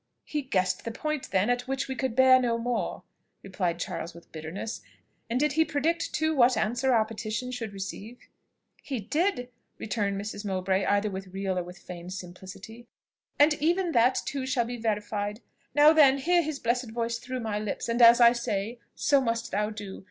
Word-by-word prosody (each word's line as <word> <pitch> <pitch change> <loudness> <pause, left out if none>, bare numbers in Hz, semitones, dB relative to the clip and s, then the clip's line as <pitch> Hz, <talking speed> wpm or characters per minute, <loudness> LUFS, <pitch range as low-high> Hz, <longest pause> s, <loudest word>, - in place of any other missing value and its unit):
"He 300 - -2
guessed 185 -8 0
the - - -4
point, 305 +5 -3
then, 190 +2 +2
at 245 +1 -2
which 270 0 -2
we 265 - -3
could 260 -3 -2
bear 260 0 +7
no 235 -2 +1
more," 240 +1 -2 0.4
replied 185 -3 -2
Charles 170 0 -5
with 170 - -15
bitterness: 165 +8 -6 0.5
"and 240 +2 0
did 300 0 +2
he 320 +2 +4
predict 320 +3 -1
too 315 +1 0
what 255 -1 +4
answer 240 +5 +1
our 225 -3 +4
petition 225 +3 -4
should 235 -4 -5
receive?" 200 +4 -7 0.6
"He 265 -4 -4
did," 250 - -1 0.3
returned 200 -2 -2
Mrs. 205 0 -6
Mowbray 190 -1 0
either 205 +1 +1
with 190 0 -6
real 190 0 -3
or - - -3
with 180 +1 -11
feigned 175 0 -9
simplicity; 190 +5 -10 0.5
"and 295 +2 +6
even 345 +3 +1
that 245 -1 +3
too 270 -2 -3
shall 260 -3 +1
be 245 +1 -5
verified. 210 -1 -2 0.4
Now, 295 +2 +7
then, 280 -4 +6
hear 345 +5 +3
his 310 -3 -3
blessed 245 -1 -1
voice 235 +1 -2
through 255 +1 -5
my 215 -2 -2
lips; 210 -2 -4
and 235 +1 0
as 235 +1 +8
I 235 -1 +8
say, 235 -1 -3 0.2
so 280 -2 +3
must 230 -2 -2
thou 210 +1 0
do. 205 -3 -7
230 Hz, 190 wpm, -27 LUFS, 200-260 Hz, 0.6 s, as